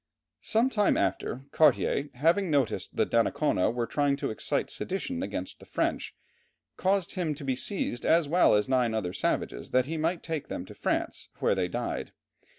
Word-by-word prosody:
Some 235 +4 +2
time 210 -4 +3
after, 130 - -1
Cartier, 145 -1 +3
having 165 +8 +2
noticed 140 -6 0
that - - 0
Donnacona 90 - +2
was 120 0 -2
trying 145 -1 +2
to 140 - -3
excite 110 - -1
sedition 250 +7 -3
against - - -5
the - - -14
French, - - -1 0.6
caused 190 -1 +1
him 170 -6 -1
to 140 -1 -8
be 130 -1 0
seized, 130 - -2
as 165 -2 +3
well 170 -6 +5
as 105 0 +2
nine 125 -4 +2
other 90 -5 -2
savages, 95 - -2
that 130 0 +3
he 160 +3 -3
might 165 +2 -1
take 160 -3 -3
them 90 - -5
to - - -11
France, - - -2
where - - +2
they - - 0
died. - - -4
150 Hz, 175 wpm, -28 LUFS, 125-180 Hz, 0.6 s, well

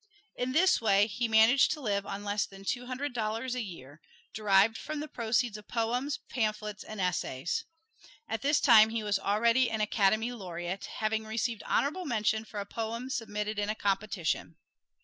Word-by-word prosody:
In 250 +1 -2
this 365 +2 +4
way 205 -2 +4
he 230 +3 -2
managed 225 +4 +5
to 310 - -7
live 200 -6 -1
on 200 +1 -5
less 205 0 -1
than 195 0 -13
two 245 +4 -2
hundred 260 +2 -3
dollars 225 +2 -2
a 250 - -2
year, 155 - -9 0.3
derived 210 +1 +4
from 305 +4 -5
the 305 - -4
proceeds 235 -3 0
of 210 - -14
poems, 245 +5 -1
pamphlets 215 -3 -2
and 215 -1 -8
essays. 180 - -1 0.6
At 225 -1 -3
this 290 +3 +3
time 220 -4 +7
he 225 -1 -2
was 205 -1 +1
already 230 +5 +3
an 220 -1 -2
"Academy 215 +2 +2
Laureate," 180 -4 -5
having 220 0 -2
received 225 0 -2
honorable 350 +6 0
mention 220 -4 0
for 210 - -7
a 200 - -4
poem 230 +4 -4
submitted 210 -3 -3
in 205 0 -1
a 215 - 0
competition. 200 -5 -1
220 Hz, 175 wpm, -30 LUFS, 205-245 Hz, 0.6 s, time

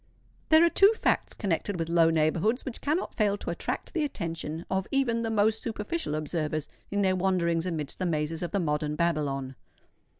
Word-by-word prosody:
There 315 +1 +7
are - - +4
two 400 +2 +7
facts - - 0
connected 200 -1 -1
with 165 -1 -2
low 165 -1 +4
neighbourhoods 165 +9 +1
which 255 - -6
cannot 310 +6 -1
fail 205 -2 +1
to - - -4
attract - - -4
the 325 - 0
attention 165 - -4
of 190 0 -1
even 245 -4 +1
the 225 - -1
most 220 0 +2
superficial 220 - -3
observers 155 -1 -2 0.2
in 200 0 0
their 190 -1 +3
wanderings 175 -2 +1
amidst 155 -5 -4
the 185 - 0
mazes 155 0 -1
of 175 - -2
the 200 - -1
modern 150 -2 -1
Babylon. 145 -5 -1
175 Hz, 180 wpm, -28 LUFS, 155-220 Hz, 0.2 s, There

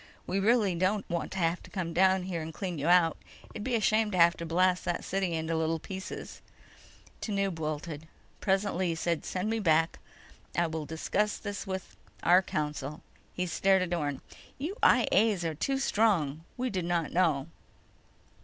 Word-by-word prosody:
We 195 - -1
really 210 -2 +3
don't 185 +4 0
want 170 -1 -2
to - - -5
have 170 -1 +1
to - - -13
come 180 -5 -3
down 185 +1 +3
there 170 -3 -3
and 160 +1 -5
clean 180 -1 -4
you 145 - -1
out. 175 -2 +5 0.4
It'd 210 - -6
be 250 0 0
a - - +2
shame 215 0 +2
to 190 - -2
have 170 0 +6
to 170 - -5
blast 180 +2 +2
that 175 - -2
city 190 -2 -1
into 160 0 -1
little 160 0 +1
pieces." 190 +4 -7 0.8
Tanub 195 -5 -1
wilted. 155 0 -4 0.3
Presently, 190 -2 +1
he 165 - 0
said: 170 0 -1
"Send 185 +2 -2
me 225 - 0
back. 165 -4 +2 0.6
I 170 - +3
will 160 -2 -4
discuss 205 +6 -1
this 205 0 -5
with... 190 -1 -5 0.3
our 180 +2 +6
council." 150 -3 -4 0.3
He 180 - -1
stared 190 +1 +3
at 175 -1 -3
Orne. 145 -5 -2 0.4
"You 315 +9 -4
I - - +5
A's 210 -6 +3
are 160 - -1
too 270 - -1
strong. 195 - +1 0.2
We 255 0 -1
did 185 -3 -2
not 170 -2 0
know." 160 -7 +2
180 Hz, 180 wpm, -30 LUFS, 165-195 Hz, 0.8 s, have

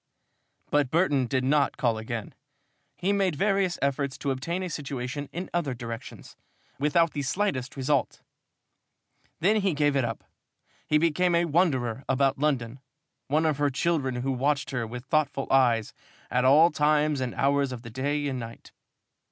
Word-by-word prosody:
But 145 -3 +2
Burton 145 -5 +2
did 130 +1 0
not 140 +2 +2
call 115 -3 +1
again. 110 -1 -5 0.6
He 190 +3 0
made 195 -5 +1
various 195 +1 +1
efforts 140 0 -1
to 140 - -2
obtain 170 +8 -3
a - - -2
situation 140 -1 -5
in 180 +2 -5
other 155 -7 -1
directions, 115 -1 -8 0.4
without 155 +3 +2
the 145 - -2
slightest 140 -4 -2
result. 135 0 0 1.2
Then 205 +6 +4
he 195 -6 +1
gave 145 -1 +2
it 135 - +2
up. 115 -2 -4 0.6
He 150 - +4
became 170 +2 +2
a 170 +1 +3
wanderer 140 -8 +1
about 135 0 +2
London, 135 -4 -1 0.5
one 155 +4 +1
of 150 -3 +1
her 145 -1 +2
children 135 -1 0
who 125 +2 -1
watched 140 +2 0
her 120 -4 -2
with 120 +3 -8
thoughtful 145 -1 0
eyes 120 -5 +3 0.4
at 125 +1 +2
all 155 +6 +6
times 150 -1 +2
and 125 -2 -3
hours 140 -1 +1
of 120 -2 -7
the 115 - -9
day 145 +4 -1
and 130 -2 -3
night. 115 -1 -9
140 Hz, 160 wpm, -27 LUFS, 130-155 Hz, 1.2 s, all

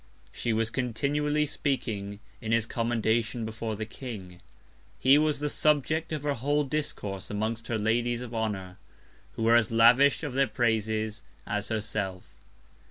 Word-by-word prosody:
She 120 - -2
was 110 0 +1
continually 145 +5 0
speaking 110 -9 -3 0.2
in 110 -2 -3
his 115 -1 +3
Commendation 115 -1 0
before 110 0 -4
the 110 +1 -4
King: 100 -7 -8 0.6
He 135 +3 +6
was 155 -1 +2
the 150 - -2
Subject 155 +2 +1
of 150 -2 -3
her 145 -1 +1
whole 145 +4 +1
Discourse 105 -10 -4
amongst 110 +2 -2
her 115 - 0
Ladies 120 +3 +1
of 125 -1 -7
Honour, 100 -5 -3 0.5
who 115 - -4
were 115 +1 +5
as 120 -3 +4
lavish 120 +7 +5
of 145 -4 -3
their 135 +1 +3
Praises 110 -1 0 0.2
as 105 0 -2
herself. 100 -4 -3
115 Hz, 150 wpm, -28 LUFS, 110-140 Hz, 0.6 s, He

